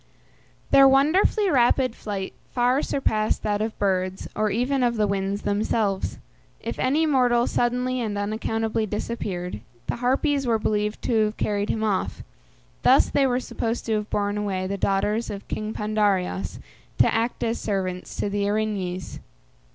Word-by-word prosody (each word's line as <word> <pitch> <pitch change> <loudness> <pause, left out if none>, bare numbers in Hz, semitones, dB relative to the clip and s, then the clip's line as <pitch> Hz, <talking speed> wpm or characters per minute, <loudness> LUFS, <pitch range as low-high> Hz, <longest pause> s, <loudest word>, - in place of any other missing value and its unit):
Their 275 0 +8
wonderfully 315 - +4
rapid 255 -1 +3
flight 195 -3 -5 0.2
far 250 +3 +3
surpassed 215 -8 0
that 205 -1 0
of 220 0 -3
birds, 185 -1 -1
or 215 0 +1
even 250 +6 0
of 240 -1 +2
the 215 -1 +2
winds 200 0 -1
themselves. 205 -1 0 0.4
If - - -5
any 295 +5 +2
mortal 250 -5 +3
suddenly 250 +1 0
and 210 -3 -2
unaccountably 220 +1 -1
disappeared, 190 - -4 0.2
the - - -2
Harpies 270 +2 +1
were 230 -2 +3
believed 210 -1 -1
to 220 -3 +2
have 210 +1 -4
carried 205 0 -1
him 220 - -1
off. 205 -3 -1 0.6
Thus - - +5
they 275 -1 +3
were 250 -1 +1
supposed 230 -2 -3
to 225 - 0
have 210 0 -1
borne 205 0 -1
away 190 -2 -2
the 195 +1 -2
daughters 205 +4 0
of 200 -1 -7
King 215 0 -3
Pandareos 205 -4 0 0.4
to - - +4
act 230 +2 -1
as 230 0 -1
servants 185 -3 -3
to - - -1
the 200 0 -1
Erinyes. 200 -5 -2
215 Hz, 155 wpm, -24 LUFS, 200-245 Hz, 0.6 s, Their